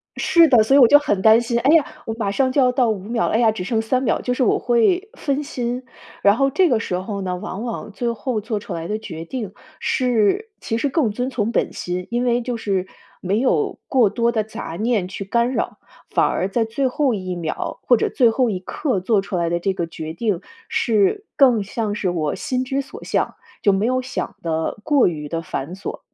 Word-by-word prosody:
是 335 -2 +5
的， 245 -6 +5
所 220 - +1
以 - - +7
我 245 - +8
就 290 - +8
很 205 -10 0
担 220 +2 +7
心， 235 0 0
哎 270 +5 +3
呀， 310 -5 +4 0.2
我 225 - -3
马 205 -4 -2
上 260 +4 +1
就 280 - +1
要 250 -1 +4
到 250 -2 +2
5 210 -3 -1
秒 230 +2 -1
了， - - -1
哎 225 - +3
呀， 225 -2 +4
只 210 -4 -5
剩 220 +2 0
3 255 +3 0
秒， 265 - +1
就 250 - -1
是 255 - 0
我 - - +3
会 350 - +2
分 285 0 -2
心。 245 -1 -3 0.4
然 200 +1 +6
后 275 0 +3
这 365 +5 +3
个 240 -4 +2
时 185 - -3
候 200 +2 -4
呢， 185 -1 -2
往 185 +3 -6
往 225 -2 -5
最 235 +3 -2
后 230 -1 -3
做 215 0 -3
出 200 - -7
来 165 0 -4
的 210 - -2
决 165 -6 -8
定 215 -1 -5 0.3
是 250 - +1
其 225 -1 -2
实 280 +4 0
更 265 -7 +1
遵 250 +4 -2
从 230 -4 -1
本 - - 0
心， 180 0 -4
因 240 +1 0
为 240 0 +2
就 245 0 -3
是 195 -4 -1 0.3
没 195 +4 0
有 400 - +1
过 245 -7 +4
多 235 +2 +1
的 220 -2 0
杂 220 -6 -7
念 220 -4 +1
去 190 +1 -6
干 235 +5 +1
扰， - - -2 0.3
反 - - +2
而 - - 0
在 225 +3 0
最 260 +4 -1
后 265 0 +1
1 185 -3 -4
秒 165 -3 -4
或 245 - +5
者 - - 0
最 235 -3 +3
后 250 0 +1
一 185 - -2
刻 235 - -2
做 200 +2 +2
出 195 -1 -5
来 170 -1 0
的 170 - 0
这 190 +2 0
个 170 -2 -2
决 160 -1 -7
定， 200 -1 -1 0.3
是 370 - +1
更 245 -6 +5
像 210 +1 -3
是 200 -3 -1
我 155 -4 -1
心 255 -4 -2
之 275 +1 -1
所 270 - -11
向， - - -1 0.3
就 200 - +4
没 195 +3 +1
有 255 +1 +1
想 255 0 -5
得 160 +4 -2
过 290 0 +4
于 150 -4 -4
地 165 0 -2
繁 155 +3 -5
琐。 195 - -6
225 Hz, 250 characters per minute, -21 LUFS, 195-255 Hz, 0.4 s, 我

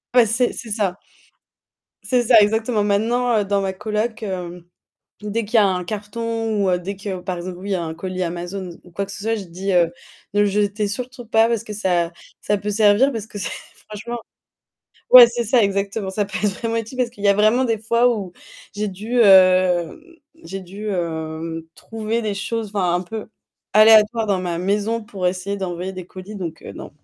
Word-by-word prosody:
Ouais, 240 -3 +6
c'est 240 +3 +1
c'est 235 - -8
ça. 205 -4 -1 1.0
C'est 250 -2 +1
ça 230 -1 +7
exactement. 220 +1 +1
Maintenant, 230 +4 +1
heu, 205 - +1
dans 200 0 +1
ma 195 -1 -1
coloc, 215 +3 -3
hem, 180 -3 -5 0.6
dès 210 +1 -2
qu'il 220 - -14
y - - +8
a 205 - +5
un 180 -1 -1
carton 220 +2 -3
ou 190 - +2
heu, 180 - +1
dès 195 +3 -5
que, 195 -1 -5
par 180 0 -4
exemple, 180 +1 -6
oui, 195 0 -2
un 165 -3 -3
colis 185 +2 -4
Amazon 175 +2 -5
ou - - -19
ou - - -22
quoi 200 +4 -3
que 200 - -10
ce 200 - -8
soit, 225 +2 0
je 205 - -5
dis, 185 +2 -4
heu: 170 -2 +3 0.4
«Ne 205 - +1
le 205 - +5
jetez 205 +1 0
surtout 245 +3 -6
pas 225 0 +4
parce 230 -2 -1
que 215 - -7
ça 175 -5 0 0.3
ça 205 - 0
peut 210 +1 -3
servir», 215 +5 +4
parce 220 -4 -5
que 205 - -9
c'est 200 - -3 0.4
franchement 230 +3 -6 0.9
ouais, 250 -1 +12
c'est 235 0 -3
ça 230 0 +4
exactement. 200 0 -1
Ça 205 +2 -1
peut 195 - -5
être 210 - +3
vraiment 230 0 -2
utile 230 +3 -4
parce 250 -2 +1
qu'il 220 -4 -13
y 200 - +5
a - - +6
vraiment 215 +5 +3
des 225 -3 0
fois 235 +3 +2
où, 195 -5 -6 0.4
j'ai 210 0 -2
dû 215 +6 -4
hem 185 -4 +5 0.5
j'ai 195 +3 -6
dû, 195 +4 -7
hem, 165 -2 -4
trouver 225 +1 -3
des 215 -2 -2
choses, 220 +3 -3
enfin, 180 -3 +1
un 175 - +1
peu 215 +4 -7 0.4
aléatoires 220 +1 +6
dans 195 -2 +1
ma 175 -2 -2
maison 205 +5 0
pour 200 -3 -5
essayer 185 +2 -2
d'envoyer 185 -1 -4
des 185 -1 -7
colis 185 +4 -10
donc 170 -5 -6
heu, - - -9
non. - - -9
205 Hz, 210 wpm, -21 LUFS, 185-225 Hz, 1.0 s, ouais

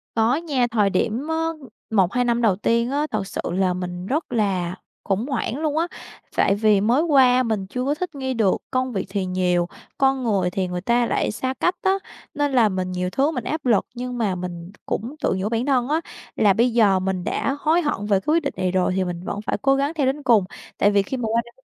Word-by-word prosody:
Có 230 +3 +3
nha, 285 -6 0
thời 210 -3 +3
điểm 225 +9 -1
á 320 - -1 0.6
1-2 220 +4 +2
năm 235 0 +1
đầu 215 -5 +3
tiên 235 +4 +1
á, 295 +2 0
thật 210 -3 -2
sự - - -4
là 185 0 +1
mình 180 0 -5
rất 300 +7 -2
là 185 -6 0 0.3
khủng 200 +4 -1
hoảng 260 -2 -2
luôn 305 0 -1
á. 335 +2 +1 0.5
Tại 195 - +3
vì 210 -1 +3
mới 235 +8 +3
qua 260 -5 +5
mình 215 -5 -2
chưa 250 +5 -3
có 285 +2 +1
thích 345 0 -5
nghi 265 -1 -2
được, 220 -6 +2
công 255 -1 0
việc 195 - -2
thì 195 -1 -2
nhiều, 180 -1 +1 0.3
con 270 -1 +2
người 195 -6 +1
thì 185 0 -2
người 180 0 -4
ta 240 +4 +2
lại - - 0
xa 260 +4 -2
cách 355 - +2
á. 380 - +3 0.4
Nên 290 -1 0
là 240 -5 +4
mình 185 -1 -3
nhiều 180 0 -2
thứ 275 +10 +1
mình 250 -7 -4
áp 310 +2 -3
lực 225 -5 +3
nhưng 250 0 -5
mà 210 -6 0
mình 175 -1 -6
cũng 240 +7 -3
tự - - +2
nhủ 200 +3 -1
bản 230 +1 -1
thân 260 -3 +2
á, 315 +3 +1 0.3
là 205 -3 +4
bây 235 +3 +2
giờ 200 -5 +4
mình 185 -1 -2
đã 275 - -1
hối 320 +4 +2
hận 290 - -2
về 200 -2 +3
cái 300 +11 0
quyết 335 0 +2
định 280 - -2
này 185 -1 0
rồi 185 0 +1
thì 190 - +1
mình 175 -1 -5
vẫn 200 - -4
phải 215 - -2
cố 275 0 +4
gắng 280 +3 0
theo 300 -5 0
đến 275 +2 -1
cùng. 230 -6 +5 0.3
Tại 205 - +4
vì 200 -1 +4
khi 260 +7 -4
mà 240 -3 -2
qua 230 +1 +2
đây 235 - -15
230 Hz, 245 wpm, -22 LUFS, 190-270 Hz, 0.6 s, qua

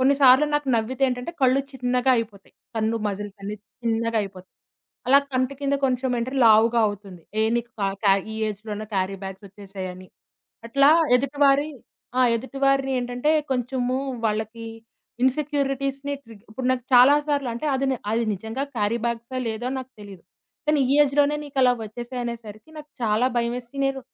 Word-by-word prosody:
కొన్ని 270 +2 +4
సార్లు 260 +3 +7
నాకు 295 -2 0
నవ్వితే 250 +4 -2
ఏంటంటే 250 +5 -3
కళ్ళు 260 +1 +4
చిన్నగా 250 0 +1
అయిపోతాయి, 210 -4 -6 0.2
కన్ను 220 +1 0
మజిల్స్ 205 0 -6
అన్నీ 205 +1 -4 0.3
చిన్నగా 230 0 0
అయిపోతాయి. 190 -2 -10 0.6
అలా 275 +2 +8
కంటి 255 +1 0
కింద 280 0 0
కొంచెం 255 0 -1
అంటే 245 +3 -3
లావుగా 225 +2 +5
అవుతుంది. 195 -4 -9 0.2
ఏ - - +4
నీకు 235 0 -3
కా 195 - +2 0.2
క్యా 200 -2 +5 0.2
ఈ - - -6
ఏజ్‌లోనే 215 +1 -6
క్యారీ 190 0 -1
బ్యాగ్స్ 190 +1 -7
వచ్చేసాయని. 190 -2 -8 0.6
అట్లా 275 +4 +5 0.3
ఎదుటివారి 280 +2 +2 0.5
ఆ! - - +4 0.2
ఎదుటివారిని 270 +2 0
ఏంటంటే, 245 +4 -1 0.2
కొంచెము 250 0 -1 0.3
వాళ్ళకీ 220 +1 -2 0.6
ఇన్సెక్యూరిటీస్‌ని 275 0 0
ట్రిగ్ 225 -3 -15
ఇప్పుడు 250 +4 -4
నాకు 255 -2 -1
చాలా 255 +3 +8
సార్లు 285 -4 0
అంటే 235 +6 -4
అది 270 +1 0
ని 260 - 0 0.2
అది 230 +1 +1
నిజంగా 220 +7 -5
క్యారిబాగ్స్, 235 +3 -2 0.2
లేదో 225 +3 -3
నాకు 260 0 -8
తెలీదు. 200 -3 -11 0.4
కానీ, 300 -2 +3
ఈ - - +4
ఏజ్‌లోనే 290 +1 +2
నీకు 280 -2 -7
అలా 250 -1 +5
వచ్చేసాయి 240 +3 -6
అనేసరికి 230 +2 -8
నాకు 300 0 -11
చాలా 220 +3 +2
భయమేసి 240 +2 -2
నేను, 270 0 -2
245 Hz, 155 wpm, -24 LUFS, 215-270 Hz, 0.6 s, అలా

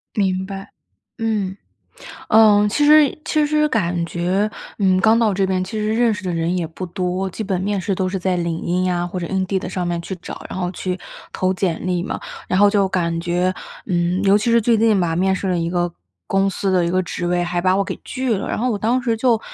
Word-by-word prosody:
明 190 -2 0
白， 195 0 -8 0.5
嗯。 210 -4 -1 0.7
嗯， 210 -1 +6
其 290 +8 +1
实 300 -2 +6
其 305 -1 +1
实 300 0 +2
感 175 - 0
觉， 185 +5 0 0.3
嗯， 190 -2 +3
刚 220 +2 +5
到 220 -3 +3
这 195 0 +1
边， 185 -1 0
其 215 +4 -4
实 215 +1 0
认 235 -1 +3
识 210 -1 -6
的 180 - -1
人 165 +2 0
也 170 - -1
不 165 +4 -7
多， 185 +1 -2
基 220 - -5
本 190 -3 -1
面 200 0 -1
试 195 +1 -1
都 185 0 -1
是 190 0 -2
在 185 0 0
领 170 -1 -2
英 180 +1 0
啊， 175 0 -1
或 180 +1 -5
者 170 - -3
Indeed 190 0 -1
上 180 -2 -3
面 170 -1 -1
去 190 +2 -6
找， - - -8
然 - - -5
后 180 -1 -1
去 185 0 -3 0.3
投 185 0 0
简 180 -2 -2
历 180 -1 0
嘛。 - - -4 0.3
然 185 - +1
后 205 0 +6
就 200 -2 +2
感 170 -3 -1
觉， 180 +2 0 0.3
嗯， 175 +1 0
尤 200 +1 +5
其 230 +3 0
是 235 - +5
最 230 +1 +3
近 220 -2 +3
吧， 165 -2 0
面 190 +2 +2
试 195 - -4
了 180 - +1
一 165 0 -1
个 175 -1 -1 0.3
公 195 0 +2
司 195 0 -1
的 180 -2 +3
一 170 - 0
个 185 +1 +1
职 175 0 -4
位， 175 0 +1
还 175 0 -1
把 185 +1 +2
我 200 - +1
给 - - -5
拒 255 -3 -1
了， 195 - -4
然 - - -2
后 250 +2 0
我 210 - -1
当 240 +4 +1
时 230 -2 0
就， 230 -1 +2
190 Hz, 275 characters per minute, -20 LUFS, 180-210 Hz, 0.7 s, 嗯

